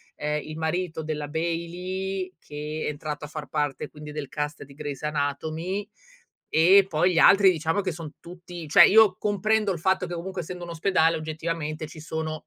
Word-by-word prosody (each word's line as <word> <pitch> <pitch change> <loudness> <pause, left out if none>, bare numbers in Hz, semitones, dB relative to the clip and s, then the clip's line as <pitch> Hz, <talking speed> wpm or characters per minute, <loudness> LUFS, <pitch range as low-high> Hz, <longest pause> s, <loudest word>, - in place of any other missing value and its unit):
ehm, 150 0 -2
il 155 0 -8
marito 160 0 -2
della 150 -2 -4
Bailey 180 +4 -3
che 150 0 -6
è - - +1
entrato 150 0 -5
a - - -8
far - - -6
parte 145 -3 -2
quindi 150 0 -10
del 150 -2 -5
cast 150 +2 -4
di 140 - -15
Grey's 145 0 -6
anatomy, 155 +6 -2 0.6
e 185 +5 +6
poi 175 +3 +2
gli - - -1
altri 195 +2 +7
diciamo 160 +2 -1
che 185 -2 -2
son 160 -2 -8
tutti 175 -1 -9
cioè 170 +3 +9
io 215 -3 +6
comprendo 210 +1 +1
il 170 - -6
fatto 190 +2 +1
che 175 - -6
ovunque 175 +2 -4
essendo 175 +1 -7
un 175 - -7
ospedale 165 -1 +2
oggettivamente 155 0 -4
ci 155 +1 -11
sono 160 0 -4
160 Hz, 185 wpm, -26 LUFS, 150-180 Hz, 0.6 s, cioè